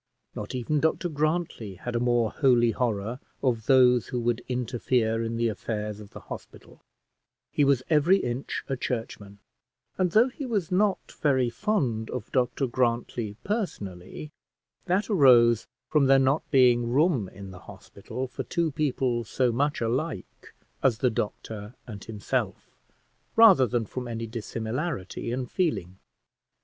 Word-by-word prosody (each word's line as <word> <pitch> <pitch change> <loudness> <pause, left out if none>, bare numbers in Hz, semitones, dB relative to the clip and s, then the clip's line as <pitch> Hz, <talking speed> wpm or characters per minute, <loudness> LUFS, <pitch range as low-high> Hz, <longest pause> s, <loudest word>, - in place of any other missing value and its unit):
Not 105 +4 -6
even 130 +5 0
Dr 160 +3 0
Grantly 155 - -2
had 120 +6 -6
a - - +2
more 120 -2 +2
holy 120 -4 +3
horror 115 0 -2 0.2
of 115 -5 0
those 125 -3 +5
who 125 - -3
would 120 0 -1
interfere 120 -2 0
in 115 0 -3
the 115 0 +1
affairs 105 -1 -4
of 105 -1 -11
the - - -11
hospital; - - -11 0.7
he 145 - +2
was 135 -2 +3
every 165 +4 +4
inch 125 -5 -3
a 135 - -1
churchman, 110 -5 -5 0.6
and 185 -1 +3
though 220 +8 +4
he 275 +3 -8
was 205 -8 -1
not 195 +2 +1
very 130 -5 +2
fond 125 - -1
of 125 -3 -6
Dr 125 +1 +1
Grantly 120 -3 -1
personally, 150 - -4 0.5
that 190 +3 +1
arose 120 - +5 0.2
from 145 -2 +3
there 135 0 +6
not 135 +3 +1
being 120 -3 +4
room 135 - +2
in 95 0 -10
the 90 - -11
hospital 130 +7 -8
for - - -6
two 170 -2 -1
people 130 -5 0
so 125 +2 0
much 145 +4 0
alike 130 +7 -3 0.3
as 125 -4 +3
the 125 0 +1
doctor 105 +1 -5
and 105 -5 -9
himself, 105 -3 -3 0.6
rather 200 - +7
than 115 0 -1
from 125 +4 -6
any 115 -1 -4
dissimilarity 115 - -4
in 125 +1 -2
feeling. 100 - -2
125 Hz, 145 wpm, -27 LUFS, 115-145 Hz, 0.7 s, rather